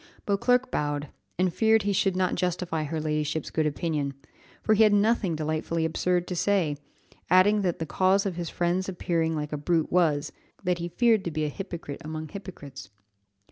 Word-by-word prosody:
Beauclerc 245 +6 +2
bowed, 145 -1 -2 0.3
and 180 -1 +1
feared 220 +1 +3
he 200 0 +1
should 195 -1 +1
not 185 0 +1
justify 175 -3 -1
her 155 +2 -3
ladyship's 155 0 -2
good 155 -1 +1
opinion, 150 -2 -2 0.5
for 220 - +3
he 215 - +3
had 215 -1 +6
nothing 205 -4 +2
delightfully 155 +1 -1
absurd 175 +2 0
to 180 - -3
say, 175 -5 +1 0.5
adding 195 +4 +5
that 180 -3 0
the 160 - -3
cause 190 +6 +2
of 190 -3 -2
his 170 -2 -4
friend's 180 +2 0
appearing 165 -3 -1
like 150 0 -4
a - - -1
brute 160 +2 0
was, 155 -5 +2 0.3
that 180 -1 0
he 170 - -3
feared 220 +3 +3
to - - 0
be 155 -1 -2
a - - -1
hypocrite 170 -4 -7
among 155 0 -5
hypocrites. 170 - -9
175 Hz, 180 wpm, -27 LUFS, 155-195 Hz, 0.5 s, had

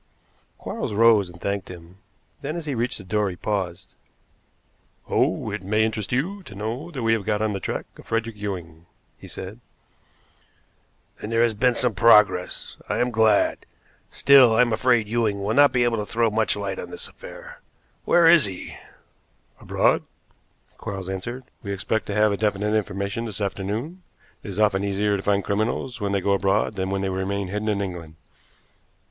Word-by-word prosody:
Quarles - - -4
rose, 110 -3 +5
and 85 -1 -13
thanked 100 0 -3
him; 90 +1 -12 0.4
then, 150 +3 -4
as 170 -2 -5
he 145 - -2
reached 120 0 -2
the 105 - -10
door, 105 +2 0
he 90 - -6
paused. 95 -3 -3 1.1
"Oh, - - 0
it - - -4
may 105 +3 +1
interest 110 -2 -3
you 175 +11 -1
to 105 - -12
know 115 - -4
that 135 -8 -5
we 115 0 +3
have 110 -3 0
got 105 +1 0
on 110 -1 0
the 100 - -3
track - - -4
of - - -14
Frederick 115 0 -2
Ewing," 90 -5 -6 0.3
he - - -11
said. 95 +5 -8 1.6
"Then 105 - -6
there 115 +1 +3
has 115 -1 +2
been 120 +3 +2
some 125 -2 +1
progress. 105 -4 +3
I - - 0
am 125 0 +1
glad. 110 -2 +2 0.4
Still, 130 -5 +6
I 115 - +5
am 120 -2 +2
afraid 120 -1 +2
Ewing 110 -3 0
will 105 +2 0
not 145 +2 +6
be 125 -1 +2
able 120 -1 +1
to 105 - -2
throw 115 -1 +1
much 110 +1 +1
light 100 -2 -4
on 90 - -6
this - - -7
affair. - - -12 0.4
Where 170 -1 +5
is 165 -5 +7
he?" 95 -3 -7 0.8
"Abroad," - - +2 0.8
Quarles 95 -2 -5
answered. 120 +7 -5 0.2
"We 100 - -5
expect 100 +3 -2
to 100 - -3
have 105 -1 +3
definite 105 0 0
information 100 +2 -2
this 110 -2 -5
afternoon. 105 - -3 0.4
It - - -11
is 100 - -6
often 105 -2 +2
easier 100 +1 +1
to 100 - -3
find 100 0 +1
criminals 110 +4 -2
when 100 -1 -1
they 100 -1 +1
go 100 +1 +2
abroad 100 +2 +1
than 95 0 -3
when 95 0 -1
they 95 - 0
remain 95 +1 -2
hidden 105 +2 -2
in 100 -1 0
England." 85 -4 -7
105 Hz, 185 wpm, -24 LUFS, 100-115 Hz, 1.6 s, is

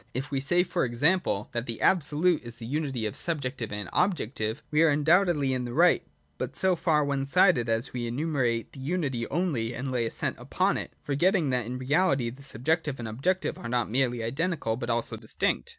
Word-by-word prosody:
If 135 +3 -3
we 135 - 0
say, 175 +6 +3
for - - -1
example, 125 - +1
that 120 -1 -3
the 115 -2 -3
absolute 165 0 +2
is 120 -1 -10
the 115 - -9
unity 135 -3 -2
of 105 - -3
subjective 130 -8 -3
and 105 -2 -4
objective, 130 - 0
we 150 +1 +3
are 165 - +6
undoubtedly 150 -1 +3
in 125 -1 -1
the 120 0 -5
right, 175 +3 +4 0.4
but - - -4
so 190 -1 +3
far 155 -3 +2
one 140 -1 -1
sided, 145 -7 +4
as 115 +3 -1
we 120 -2 -3
enun 150 +7 -2
ciate 120 -5 0
the - - -12
unity 135 -5 -2
only 135 -9 -1
and 130 +1 -4
lay 120 -2 0
the - - 0
accent - - 0
upon - - 0
it, - - -6
forgetting 160 +1 +2
that 125 -3 0
in 125 +1 -4
reality 135 -2 +1
the 130 +4 -13
subjective 145 +3 -1
and 115 - -5
objective 135 +13 -1
are 115 - -6
not 120 -2 0
merely 120 -2 +1
identical 135 -1 -1
but 120 0 -5
also 120 0 -1
distinct. - - -1
135 Hz, 205 wpm, -27 LUFS, 120-160 Hz, 0.4 s, are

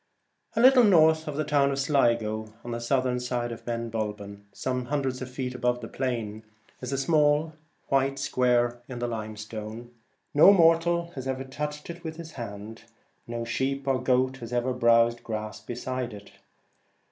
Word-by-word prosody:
A - - 0
little 255 0 +7
north 160 -6 +5
of 145 -1 -4
the 155 - +1
town 145 -2 +2
of 135 - -2
Sligo, 115 -6 +1
on 120 - -6
the 115 0 -3
southern 125 0 +1
side 125 -1 -2
of 115 - -9
Ben 115 -1 -3
Bulben, 105 -2 -5
some 125 +4 -3
hundreds 135 -2 -2
of 130 - -5
feet 125 0 -4
above 125 0 0
the - - -7
plain, 115 -5 -3 0.4
is 125 - -5
a 135 - -1
small 150 +1 +2 0.4
white 135 0 +2
square 120 -3 +1
in 125 - -6
the 120 - -2
limestone. 110 +1 -6 0.4
No 155 +7 +8
mortal 170 -1 +3
has 130 -5 -7
ever 130 0 -2
touched 150 +2 -5
it 170 +1 -12
with 160 -1 -5
his 165 -1 -9
hand; 110 -3 -8 0.4
no 115 0 -4
sheep 135 +3 -2
or 130 -1 +1
goat 130 +1 +1
has 120 -2 -9
ever 125 +1 0
browsed 120 -1 +3
grass 110 -2 -5
beside 125 +1 -4
it. 100 0 -13
125 Hz, 170 wpm, -27 LUFS, 115-140 Hz, 0.4 s, No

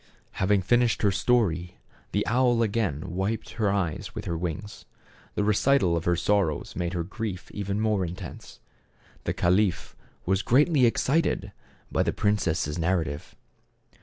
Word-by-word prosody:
Having 95 0 +3
finished 120 +3 +2
her 100 - +4
story 90 -6 +1 0.3
the - - 0
owl 120 0 +3
again 100 -9 -1
wiped 95 +5 -2
her 110 -3 0
eyes 90 -6 -2
with - - -5
her 85 - -2
wings. 90 +4 -5 0.5
The 105 - +1
recital 105 -2 +3
of 85 - -2
her 85 - +3
sorrows 95 -4 0
made 90 0 -2
her 85 -2 -1
grief 100 0 -6
even 100 0 -3
more 110 -3 +1
intense. 90 -2 -8 0.7
The - - 0
caliph 90 0 +1 0.3
was 95 +1 +1
greatly 140 +2 +4
excited 145 +7 +1 0.4
by - - +1
the - - 0
princess' 85 -6 0
narrative. 80 -4 -1
100 Hz, 140 wpm, -26 LUFS, 85-110 Hz, 0.7 s, her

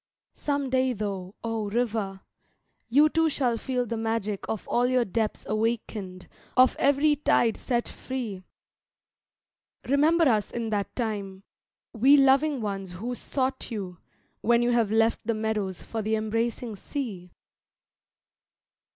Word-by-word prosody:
Some 285 -2 -2
day 260 0 +2
though, 195 -3 -4
oh, 225 -2 -2
river! 210 -4 -1 0.7
you 290 +6 +6
too 325 +1 +2
shall 255 -5 0
feel 250 +1 -2
the 230 0 -3
magic 225 -3 -2
Of 220 - -4
all 245 +1 +2
your 250 -1 +2
depths 220 +2 -2
awakened, 215 -4 -2 0.3
of 255 0 +6
every 285 +2 +4
tide 235 -5 +3
set 240 -2 -1
free; 235 -8 -5 1.5
Remember 310 +4 +4
us 215 -5 +2
in 230 -2 -4
that 205 -2 -2
time, 200 -5 -3 0.5
we 265 +5 +6
loving 275 0 +4
ones 195 -3 -4
who 230 +8 -4
sought 260 +1 -2
you, 190 -7 -5 0.4
When 235 +1 +3
you 240 - +2
have 235 -3 +2
left 225 +1 +1
the 230 - +1
meadows 215 -4 -2
for 225 - -4
the 215 +1 0
embracing 225 +1 -2
sea! 200 -9 -5
230 Hz, 135 wpm, -27 LUFS, 210-255 Hz, 1.5 s, you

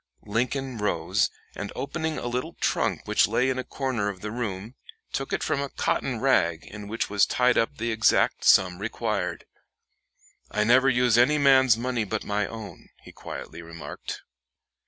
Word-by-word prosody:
Lincoln 125 +3 -2
rose, 105 - +1 0.2
and 105 - -6
opening 160 +2 -3
a - - -5
little 125 +1 -3
trunk - - 0
which - - +3
lay 130 +1 +1
in 130 - -2
a - - -2
corner 125 -8 -2
of 95 -3 -7
the 105 - -5
room, 110 -2 -4 0.4
took 135 - -3
from - - 0
it 140 - -1
a - - -9
cotton - - -1
rag 85 -1 +2
in 105 0 -9
which 115 +2 -2
was 105 -1 +2
tied 125 0 +3
up 115 - +1
the 115 +1 -2
exact 110 -1 +2
sum 90 -1 +5
required. 105 -4 -3 1.0
"I 105 - 0
never 130 +4 +5
use 120 -2 +3
any 145 +5 +4
man's 130 -4 +5
money 120 -1 -1
but 105 +1 -3
my 105 0 -1
own," 110 -2 -9
he - - -12
quietly - - -8
remarked. 85 -1 -8
115 Hz, 170 wpm, -26 LUFS, 105-130 Hz, 1.0 s, sum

